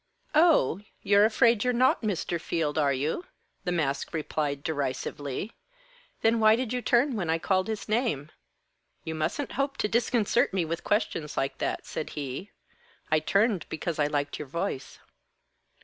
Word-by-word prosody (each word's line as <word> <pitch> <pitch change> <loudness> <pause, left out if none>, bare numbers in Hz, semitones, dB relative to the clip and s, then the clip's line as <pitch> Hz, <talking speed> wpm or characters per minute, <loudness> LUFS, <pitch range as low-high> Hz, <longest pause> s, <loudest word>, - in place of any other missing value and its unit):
"Oh 305 - +4 0.2
you're 205 +1 +5
afraid 230 -1 +4
you're 250 0 +2
not 255 +2 +3
Mr. 180 -5 -2
Field, 160 -3 -1
are 145 -2 +3
you?" 150 - -2 0.4
the 180 - 0
mask 145 -4 -1
replied 150 -2 -2
derisively. 145 - -3 0.7
"Then 225 +1 +4
why 215 0 +6
did 245 0 -2
you 250 - -1
turn 245 +2 +3
when 180 -6 -2
I 165 - +3
called 185 +3 +1
his 220 -2 -4
name?" 215 - 0 0.7
"You 160 - -4
mustn't 160 - -2
hope 275 0 -1
to - - +1
disconcert 235 -1 +2
me 180 -3 +1
with 165 +1 -4
questions 160 -7 -1
like 135 +1 -1
that," - - -2
said 155 - -4
he. 140 +7 -4 0.6
"I 155 - +5
turned 200 +2 +1
because 160 +1 -3
I 145 - +3
liked 145 -1 -2
your 150 - -6
voice." 170 -1 -4
180 Hz, 160 wpm, -28 LUFS, 150-225 Hz, 0.7 s, why